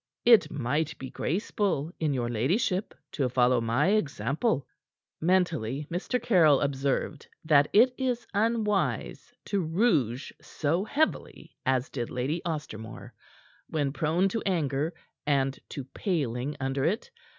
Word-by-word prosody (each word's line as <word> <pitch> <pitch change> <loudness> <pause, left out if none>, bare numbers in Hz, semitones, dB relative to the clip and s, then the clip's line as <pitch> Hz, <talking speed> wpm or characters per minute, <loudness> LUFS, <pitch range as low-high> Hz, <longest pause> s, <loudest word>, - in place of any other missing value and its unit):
It 235 -2 +7
might 150 +5 -1
be 130 -1 -7
graceful 180 -4 -1
in 155 -2 +1
your 125 -3 -1
ladyship 180 - 0 0.2
to 135 -4 0
follow 125 0 +3
my 120 +9 +2
example." 155 - 0 0.6
Mentally 160 -7 +1
Mr. 185 +8 -1
Caryll 160 - +5
observed 140 +1 -1 0.2
that 145 -2 +5
it 245 +5 +5
is 250 -2 -1
unwise 215 -1 0
to 200 - 0
rouge 160 - +1
so 160 +5 -1
heavily 310 +7 -2
as 130 0 +2
did 120 -4 -4
Lady 135 +7 -2
Ostermore 115 -9 -6 0.6
when 145 -3 -1
prone 165 +5 +1
to 225 +2 -2
anger 155 -5 0 0.4
and 135 -2 +1
to 140 - -5
paling 140 - -2
under 135 0 -1
it. 215 - -1
150 Hz, 125 wpm, -28 LUFS, 135-190 Hz, 0.6 s, It